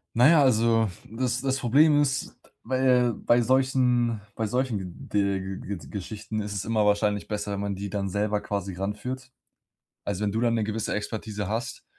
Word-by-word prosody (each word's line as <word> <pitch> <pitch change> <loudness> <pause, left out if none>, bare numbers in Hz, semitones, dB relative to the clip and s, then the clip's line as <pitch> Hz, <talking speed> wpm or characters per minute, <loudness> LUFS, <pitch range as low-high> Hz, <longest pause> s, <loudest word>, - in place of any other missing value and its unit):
Na 120 +3 +6
ja, 165 -2 +6
also 115 -3 +3 0.2
das 125 +2 -1
das 135 0 0
Problem 145 +5 +5
ist 140 -1 -1 0.3
bei 125 -1 +3
bei 120 +3 +2
solchen 125 -2 +2
bei 110 - -1
solchen 105 -7 -3
Ge 100 -1 +1 0.2
Ge 100 0 -5
Geschichten 105 +2 -5
ist 105 0 -4
es 100 - -3
immer 110 -2 +2
wahrscheinlich 105 0 +1
besser, 105 -1 -3
wenn 100 - -3
man 100 0 -2
die 100 +1 -5
dann 100 0 -2
selber 105 +2 0
quasi 100 -2 -3
ranführt. 125 +7 -5 0.7
Also, 100 +1 -2
wenn 100 - 0
du 110 - 0
dann 120 -1 +2
'ne 110 -2 +1
gewisse 110 +1 -2
Expertise 105 -1 -4
hast, 115 +2 -4
110 Hz, 175 wpm, -26 LUFS, 105-125 Hz, 0.7 s, Na